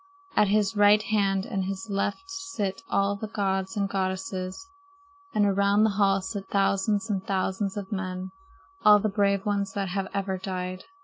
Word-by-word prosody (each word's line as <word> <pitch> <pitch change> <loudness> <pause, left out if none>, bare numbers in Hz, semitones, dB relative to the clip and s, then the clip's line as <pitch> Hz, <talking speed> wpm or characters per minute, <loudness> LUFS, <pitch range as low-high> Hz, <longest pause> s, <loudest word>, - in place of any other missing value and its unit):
At 210 - +5
his 205 0 +2
right 205 +1 +6
hand 195 -3 +1
and 190 -1 -2
his 195 +4 -4
left 200 - -1
sit 385 - -4
all 200 0 +2
the 215 +2 -5
gods 195 -1 -1
and 200 -1 +1
goddesses, 190 - -3 0.6
and 210 - +2
around 200 +1 +3
the 220 - +3
hall 195 -1 +2
sit 195 0 -5
thousands 200 +2 +1
and 195 -4 -1
thousands 190 +1 -1
of 200 0 -5
men, 185 -1 -4 0.5
all 210 0 +8
the 215 +1 0
brave 200 -1 +1
ones 200 -1 -1
that 195 -2 -2
have 195 +1 -2
ever 195 -1 -2
died. 185 -1 -4
200 Hz, 170 wpm, -27 LUFS, 190-205 Hz, 0.6 s, all